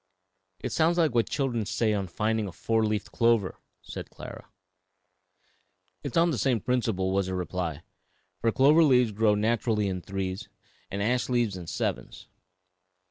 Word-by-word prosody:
'" -, -, -50 dB
"It -, -, -2 dB
sounds 165 Hz, +2 st, +2 dB
like 160 Hz, -6 st, +3 dB
what 115 Hz, -1 st, +2 dB
children 125 Hz, -5 st, -1 dB
say 110 Hz, +2 st, 0 dB
on 100 Hz, -2 st, -1 dB
finding 110 Hz, +3 st, -1 dB
a -, -, -6 dB
four 110 Hz, +5 st, 0 dB
leafed 105 Hz, -1 st, -1 dB
clover," 115 Hz, -5 st, +2 dB, 0.2 s
said -, -, -7 dB
Clara. -, -, -10 dB, 1.5 s
"It -, -, -5 dB
is -, -, 0 dB
on 170 Hz, +1 st, +4 dB
the 130 Hz, -, -2 dB
same 125 Hz, -2 st, +2 dB
principle," 110 Hz, -5 st, 0 dB
was 95 Hz, -1 st, +1 dB
the 95 Hz, -, -2 dB
reply, 90 Hz, -3 st, -3 dB, 0.6 s
"for 115 Hz, -, +2 dB
clover 150 Hz, +7 st, +5 dB
leaves 125 Hz, -6 st, +4 dB
grow 105 Hz, 0 st, +3 dB
naturally 110 Hz, 0 st, +1 dB
in 90 Hz, -2 st, -3 dB
threes 95 Hz, +2 st, -4 dB, 0.4 s
and 100 Hz, +1 st, -2 dB
ash 125 Hz, +3 st, 0 dB
leaves 120 Hz, -5 st, +1 dB
in 90 Hz, -2 st, -8 dB
sevens. -, -, -3 dB
110 Hz, 165 wpm, -27 LUFS, 95-125 Hz, 1.5 s, clover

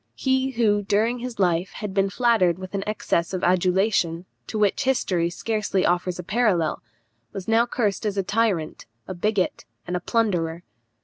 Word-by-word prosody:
He 265 Hz, 0 st, +1 dB
who, 220 Hz, -5 st, +2 dB
during 220 Hz, +4 st, +1 dB
his 245 Hz, 0 st, -6 dB
life, 180 Hz, -1 st, +1 dB
had 210 Hz, -3 st, -5 dB
been 195 Hz, 0 st, +2 dB
flattered 200 Hz, -6 st, +2 dB
with 185 Hz, +1 st, -9 dB
an 195 Hz, -1 st, -2 dB
excess 190 Hz, -4 st, -1 dB
of 180 Hz, -, -4 dB
adulation, 180 Hz, -1 st, +2 dB, 0.2 s
to 220 Hz, -, -4 dB
which 210 Hz, +6 st, +1 dB
history 185 Hz, -10 st, +1 dB
scarcely 210 Hz, 0 st, -1 dB
offers 175 Hz, 0 st, 0 dB
a 180 Hz, -, -6 dB
parallel, 190 Hz, -5 st, +1 dB, 0.5 s
was 190 Hz, -, -6 dB
now 225 Hz, +2 st, +3 dB
cursed 215 Hz, -4 st, -1 dB
as 205 Hz, -1 st, -3 dB
a 195 Hz, -, +1 dB
tyrant, 195 Hz, -, -1 dB, 0.2 s
a 185 Hz, -, -4 dB
bigot, 195 Hz, +1 st, -1 dB, 0.2 s
and 180 Hz, -, -3 dB
a -, -, 0 dB
plunderer. 175 Hz, -6 st, 0 dB
195 Hz, 170 wpm, -24 LUFS, 180-225 Hz, 0.5 s, now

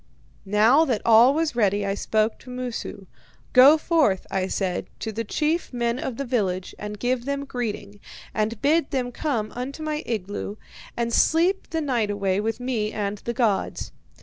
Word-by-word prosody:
"Now 220 Hz, +9 st, +5 dB
that 245 Hz, -8 st, -1 dB
all 235 Hz, +3 st, +7 dB
was 320 Hz, -4 st, 0 dB
ready, 205 Hz, -3 st, +2 dB
I 195 Hz, -, 0 dB
spoke 215 Hz, +2 st, 0 dB
to 255 Hz, -, -14 dB
Moosu. 250 Hz, -5 st, -5 dB, 0.5 s
'Go 270 Hz, +5 st, +8 dB
forth,' 305 Hz, -, +1 dB
I 190 Hz, -1 st, 0 dB
said, 185 Hz, -2 st, -2 dB
'to 220 Hz, -, -4 dB
the 225 Hz, +2 st, -3 dB
chief 310 Hz, +9 st, -1 dB
men 240 Hz, 0 st, -1 dB
of 265 Hz, -6 st, -4 dB
the 275 Hz, -, -3 dB
village, 190 Hz, -7 st, -1 dB
and 210 Hz, 0 st, -6 dB
give 245 Hz, +2 st, -1 dB
them 280 Hz, 0 st, -2 dB
greeting, 210 Hz, -6 st, -5 dB, 0.3 s
and 215 Hz, +1 st, -1 dB
bid 310 Hz, +1 st, +3 dB
them 250 Hz, -2 st, -2 dB
come 235 Hz, -6 st, -2 dB
into 270 Hz, +5 st, -6 dB
my 305 Hz, 0 st, -2 dB
igloo 205 Hz, -2 st, -4 dB, 0.4 s
and 235 Hz, 0 st, -1 dB
sleep 345 Hz, +9 st, +2 dB
the 325 Hz, -, -1 dB
night 245 Hz, -8 st, 0 dB
away 200 Hz, -2 st, 0 dB
with 225 Hz, +2 st, -2 dB
me 235 Hz, -4 st, -2 dB
and 205 Hz, -1 st, -3 dB
the 235 Hz, -, -4 dB
gods.' 225 Hz, -6 st, -1 dB
235 Hz, 175 wpm, -24 LUFS, 210-275 Hz, 0.5 s, Go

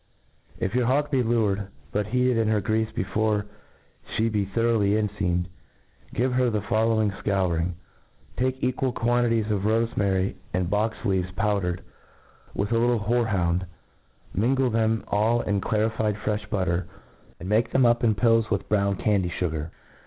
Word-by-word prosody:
If 95 Hz, -, -2 dB
your 125 Hz, -1 st, +1 dB
hawk 145 Hz, +3 st, +1 dB
be 135 Hz, -3 st, +3 dB
lured, 110 Hz, -4 st, +1 dB, 0.2 s
but 105 Hz, +3 st, -1 dB
heated 125 Hz, +2 st, +2 dB
in 115 Hz, -1 st, +1 dB
her 110 Hz, -1 st, +2 dB
greafe 110 Hz, +2 st, 0 dB
before 105 Hz, +2 st, 0 dB, 0.7 s
flis 115 Hz, +1 st, +1 dB
be 105 Hz, -2 st, 0 dB
thoroughly 105 Hz, 0 st, +1 dB
enfeamed, 100 Hz, -5 st, 0 dB, 0.7 s
giv? 125 Hz, +1 st, +1 dB
her 125 Hz, -1 st, +2 dB
the 105 Hz, -3 st, -1 dB
following 110 Hz, -1 st, +2 dB
fcouring: 90 Hz, -4 st, 0 dB, 0.6 s
Take 130 Hz, +1 st, -1 dB
equal 130 Hz, 0 st, 0 dB
quan* 120 Hz, +1 st, +1 dB
titles 110 Hz, -2 st, 0 dB
of 100 Hz, -2 st, 0 dB
rofemary 100 Hz, -3 st, 0 dB, 0.2 s
and 90 Hz, -1 st, -1 dB
box 110 Hz, +2 st, 0 dB
leaves 95 Hz, -2 st, +1 dB
powdered, 100 Hz, -5 st, 0 dB, 0.7 s
with 100 Hz, +2 st, -1 dB
a 115 Hz, -, +3 dB
little 120 Hz, -1 st, +2 dB
horej^ound; 100 Hz, -6 st, +1 dB, 0.7 s
mingle 125 Hz, +5 st, +2 dB
them 110 Hz, 0 st, +1 dB
all 110 Hz, +3 st, +2 dB
in 100 Hz, -1 st, -1 dB
clarified 110 Hz, 0 st, 0 dB
frefli 105 Hz, 0 st, -3 dB
butter, 90 Hz, -4 st, -1 dB, 0.5 s
and 90 Hz, -, -7 dB
make 110 Hz, +3 st, +2 dB
them 130 Hz, -2 st, +3 dB
up 120 Hz, 0 st, +3 dB
in 110 Hz, -3 st, +3 dB
pills 115 Hz, +2 st, +3 dB
with 100 Hz, -3 st, -1 dB
brown 100 Hz, -1 st, +2 dB
candy 95 Hz, -3 st, +1 dB
fugar. 80 Hz, -3 st, -2 dB
105 Hz, 150 wpm, -25 LUFS, 100-115 Hz, 0.7 s, be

